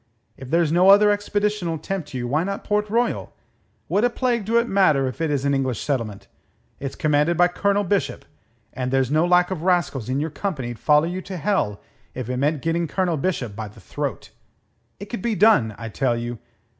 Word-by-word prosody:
If 130 -1 -10
there's 165 -1 +2
no 180 +3 +5
other 205 +1 +7
expedition'll 205 -4 -1
tempt 155 -3 -5
you, 120 -1 -3
why 150 +6 +1
not 195 +1 -4
Port 210 0 0
Royal? 235 +2 -1 0.5
What 200 +6 +1
a 245 - +4
plague 240 -3 -1
do 230 +3 +2
it 235 0 +2
matter 155 - +3
if 130 +4 -5
it 160 - 0
is 140 -2 -1
an 140 - +2
English 130 -4 -1
settlement? 115 -8 -3 0.5
It's 135 -1 -5
commanded 150 +2 +1
by 175 0 +5
Colonel 200 +3 +1
Bishop, 200 +1 -1 0.5
and 125 -1 -3
there's 135 0 +1
no 155 +3 +3
lack 180 +1 +3
of 180 -4 -3
rascals 170 - 0
in 130 +2 0
your 155 +2 -2
company'd 135 - -4
follow 150 +1 +4
you 180 +2 -3
to 185 0 -7
hell 170 - 0 0.4
if 125 -1 -4
it 125 - -2
meant 145 +2 0
getting 165 +1 0
Colonel 180 +1 0
Bishop 135 - -2
by 110 0 -5
the 105 +2 -15
throat. 95 - -5 0.7
It 200 - -6
could 220 -1 -6
be 230 0 -1
done, 170 - +4
I 115 - -6
tell 120 +1 0
you. 120 -1 -5
165 Hz, 205 wpm, -23 LUFS, 130-195 Hz, 0.7 s, other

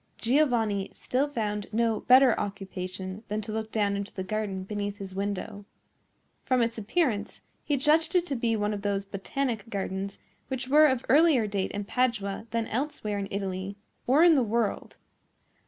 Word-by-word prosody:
Giovanni 230 -7 +1
still 265 +3 0
found 210 -7 -3
no 225 -1 +1
better 255 -1 +6
occupation 190 0 -5
than 210 +1 -2
to 215 +1 -6
look 220 0 -4
down 205 -2 +1
into 200 0 -4
the 190 - -5
garden 195 -1 -3
beneath 205 0 -4
his 195 -2 -7
window. 200 +1 -4 0.8
From 255 -2 +2
its 230 0 -2
appearance, 220 - -1 0.2
he 290 - 0
judged 310 +6 +2
it 355 -1 +4
to 285 - -2
be 235 -2 +1
one 210 0 0
of 205 - -4
those 200 -1 -1
botanic 225 +3 -3
gardens 195 -1 -3 0.3
which 260 -1 -3
were 305 +3 +7
of 260 -3 0
earlier 290 -5 +5
date 200 -2 -1
in 205 - -4
Padua 220 -2 -1
than 230 0 -1
elsewhere 220 -5 -2
in 195 - -3
Italy 195 0 -3 0.3
or 280 +6 +5
in 345 -1 +7
the 280 - +4
world. 230 -1 -1
215 Hz, 170 wpm, -28 LUFS, 200-255 Hz, 0.8 s, were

